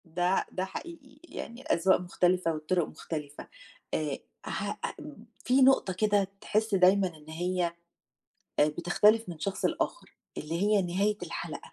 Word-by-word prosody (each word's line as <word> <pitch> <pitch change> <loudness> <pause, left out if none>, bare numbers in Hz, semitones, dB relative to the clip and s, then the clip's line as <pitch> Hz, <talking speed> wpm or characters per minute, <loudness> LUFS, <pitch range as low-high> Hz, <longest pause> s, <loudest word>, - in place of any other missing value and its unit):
ده 180 +2 +2
ده 185 0 -2
حقيقي، 290 - -9
يعني 235 +2 -7
الأذواق 190 -5 +3
مختلفة 180 -1 +1
والطُرُق 155 +2 0
مختلفة، 150 -3 -7 0.5
آآ - - -1 0.3
ه - - -2
أ - - -4 0.5
في 255 +2 +4
نقطة 260 -8 +5
كده 205 0 +2
تحس 215 -1 +1
دايمًا 190 +1 +5
إن 150 +1 -16
هي، 175 +1 -1 0.9
آآ 150 - +5
بتختلف 185 +7 +3
من 170 - -6
شخص 195 +5 -3
لآخر، - - -2 0.2
اللي 165 +5 -3
هي 210 -1 +4
نهاية 200 +4 0
الحلقة، - - -6
185 Hz, 140 wpm, -29 LUFS, 170-210 Hz, 0.9 s, نقطة